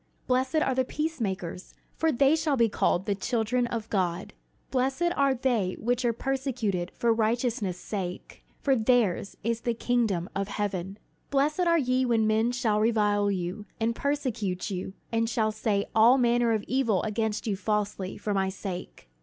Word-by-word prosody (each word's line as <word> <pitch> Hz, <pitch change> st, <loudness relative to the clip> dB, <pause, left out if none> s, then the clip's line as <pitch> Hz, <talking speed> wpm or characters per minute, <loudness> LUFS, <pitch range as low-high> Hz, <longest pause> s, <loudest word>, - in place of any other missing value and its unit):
"Blessed 260 Hz, +4 st, +1 dB
are 310 Hz, -4 st, +2 dB
the 260 Hz, 0 st, +2 dB
peacemakers: 215 Hz, -, -4 dB, 0.2 s
for 320 Hz, 0 st, +2 dB
they 275 Hz, +3 st, +4 dB
shall 310 Hz, -3 st, 0 dB
be 230 Hz, -1 st, +4 dB
called 190 Hz, -2 st, +1 dB
the 205 Hz, -, +1 dB
children 240 Hz, +4 st, 0 dB
of 225 Hz, -2 st, -4 dB
God. 180 Hz, -3 st, -1 dB, 0.4 s
"Blessed 270 Hz, +7 st, +1 dB
are 275 Hz, -1 st, +3 dB
they 235 Hz, -7 st, 0 dB
which 245 Hz, +2 st, 0 dB
are 240 Hz, -, +3 dB
persecuted 240 Hz, -8 st, -2 dB
for 235 Hz, -1 st, +2 dB
righteousness' 225 Hz, -4 st, 0 dB
sake: 180 Hz, -2 st, -6 dB, 0.2 s
for 270 Hz, -2 st, +3 dB
theirs 220 Hz, -5 st, +1 dB
is 230 Hz, +1 st, -1 dB
the 235 Hz, -1 st, -1 dB
kingdom 220 Hz, -8 st, 0 dB
of 195 Hz, 0 st, -1 dB
heaven. 200 Hz, -2 st, -3 dB, 0.3 s
"Blessed 285 Hz, +4 st, +1 dB
are 335 Hz, 0 st, +4 dB
ye 255 Hz, -3 st, +1 dB
when 230 Hz, -3 st, +2 dB
men 220 Hz, +2 st, +2 dB
shall 235 Hz, -4 st, +1 dB
revile 210 Hz, -2 st, +2 dB
you, 190 Hz, +2 st, -3 dB
and 230 Hz, +1 st, 0 dB
persecute 235 Hz, -11 st, -2 dB
you, 190 Hz, 0 st, -4 dB, 0.2 s
and 230 Hz, 0 st, +1 dB
shall 220 Hz, -1 st, +1 dB
say 210 Hz, -2 st, 0 dB
all 230 Hz, +4 st, +6 dB
manner 240 Hz, -1 st, +3 dB
of 215 Hz, -2 st, 0 dB
evil 230 Hz, -7 st, +1 dB
against 220 Hz, 0 st, -1 dB
you 210 Hz, -3 st, 0 dB
falsely, 205 Hz, -2 st, -2 dB
for 210 Hz, -, -2 dB
my 190 Hz, -1 st, +1 dB
sake. 185 Hz, -, -7 dB
225 Hz, 165 wpm, -27 LUFS, 200-250 Hz, 0.4 s, all